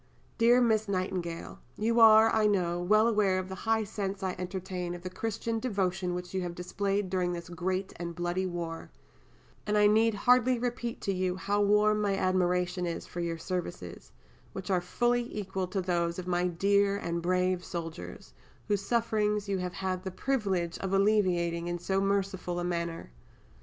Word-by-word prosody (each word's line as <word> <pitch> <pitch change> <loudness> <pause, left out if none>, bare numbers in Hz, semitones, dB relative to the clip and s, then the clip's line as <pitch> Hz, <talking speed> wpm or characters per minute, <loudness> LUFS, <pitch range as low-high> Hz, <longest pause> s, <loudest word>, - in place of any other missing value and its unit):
DEAR 240 +2 +6
MISS 220 -2 +2
NIGHTINGALE 185 -3 -3 0.2
You 230 +2 +1
are, 220 0 +8
I 220 -1 +3
know, 175 -4 +1
well 215 +5 +4
aware 210 -4 +2
of 185 0 -3
the - - -5 0.2
high 225 -1 +3
sense 195 -1 -4
I 185 -1 -1
entertain 180 -1 -4
of 175 - -10
the 185 - -5
Christian 225 +2 -3
devotion 190 -6 -1
which 180 0 -6
you 190 - -1
have 175 -1 -4
displayed 195 +2 -1
during 180 -1 0
this 170 0 -6
great 185 +3 -2
and 170 -1 -5
bloody 175 +2 -1
war, 170 -2 -5 0.8
and 210 0 +2
I 210 - +5
need 220 +1 +4
hardly 250 +4 +4
repeat 240 -1 -3
to 195 - -1
you 185 -1 -1
how 205 +2 0
warm 210 +1 +3
my 200 -2 +1
admiration 180 -1 +1
is 170 - -4
for 175 - -8
your 170 -1 -2
services, 170 - -5 0.4
which 190 +1 -5
are 180 -2 +2
fully 240 +6 0
equal 190 -2 -3
to 190 +1 -2
those 170 -2 0
of 185 - -5
my 180 0 +1
dear 200 +3 +2
and 170 -4 -3
brave 180 +1 +1
soldiers, 165 -2 -7 0.3
whose 205 -2 +1
sufferings 210 -2 0
you 195 -1 -1
have 180 0 -3
had 185 -1 -3
the 190 - -3
privilege 190 -6 -1
of 195 0 -3
alleviating 180 -4 +2
in 175 0 -2
so 190 +3 -1
merciful 195 -3 -1
a - - -2
manner. 170 - -3
190 Hz, 180 wpm, -29 LUFS, 175-210 Hz, 0.8 s, are